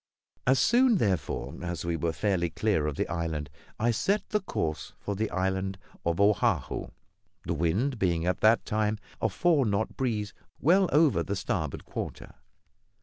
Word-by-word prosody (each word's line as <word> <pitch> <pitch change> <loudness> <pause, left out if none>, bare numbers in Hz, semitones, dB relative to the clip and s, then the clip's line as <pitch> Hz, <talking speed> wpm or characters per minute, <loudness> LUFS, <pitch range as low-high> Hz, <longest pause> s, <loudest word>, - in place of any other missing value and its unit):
As 130 +1 +5
soon, 245 - +4
therefore, 95 - -1
as 85 -2 -4
we 85 -1 0
were 85 +1 0
fairly 85 +1 0
clear 95 -4 0
of 75 - -2
the - - -1
island 80 -4 -3 0.3
I 120 +2 +3
set 195 - 0
the 210 - +1
course 80 - -3
for 100 - -4
the 110 +2 -1
island 95 +1 -1 0.3
of 85 +1 0
Oahu; 100 -1 +2 0.6
the - - -1
wind 105 - 0
being 85 -3 +1
at 90 - 0
the 110 +2 +6
time 110 0 0 0.2
a 110 - +2
four 145 - +3
knot 105 -1 -1
breeze, 110 -6 -1 0.3
well 185 +5 +4
over 150 -1 +4
the 100 - -2
starboard 80 -6 -3
quarter. - - -6
100 Hz, 160 wpm, -28 LUFS, 85-120 Hz, 0.6 s, the